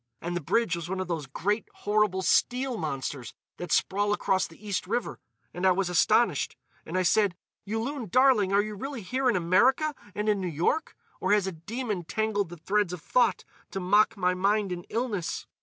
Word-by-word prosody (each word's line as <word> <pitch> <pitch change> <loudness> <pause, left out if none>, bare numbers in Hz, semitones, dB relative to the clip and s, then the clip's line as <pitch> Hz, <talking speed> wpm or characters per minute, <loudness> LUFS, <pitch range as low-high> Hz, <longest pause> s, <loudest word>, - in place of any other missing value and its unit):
And 175 +1 -4
the 175 - -2
bridge 180 +4 +1
was 170 0 -6
one 190 0 -2
of 185 - -3
those 160 -5 -3
great, 205 +10 -1
horrible 205 -2 +1
steel 250 +8 +2
monsters 135 - -4 0.2
that 175 - -6
sprawl 205 +2 +2
across 190 -2 +1
the 195 +6 -14
East 200 - -2
River. 240 - -2 0.3
And 180 - -6
I 190 - +6
was 185 -1 -1
astonished, 175 - +2 0.3
and 175 - -2
I 185 - +2
said, 200 0 +3 0.3
'Yulun, 225 +3 -3
darling, 250 -4 +4
are 200 +1 +4
you 215 0 -5
really 245 +2 -6
here 255 +7 0
in 235 - +2
America 240 - +3 0.2
and 210 +1 -2
in 205 -2 +2
New 185 - -2
York, 170 - -1 0.2
or - - +2
has 205 -2 +3
a 190 - -2
demon 205 +3 -4
tangled 205 +1 -1
the 175 - -9
threads 195 +2 0
of 180 - -6
thought 245 +3 +2 0.3
to 195 - -4
mock 205 +4 +3
my 180 -1 +2
mind 200 +2 +1
in 175 -1 -5
illness? 225 -7 -3
200 Hz, 195 wpm, -27 LUFS, 180-220 Hz, 0.3 s, I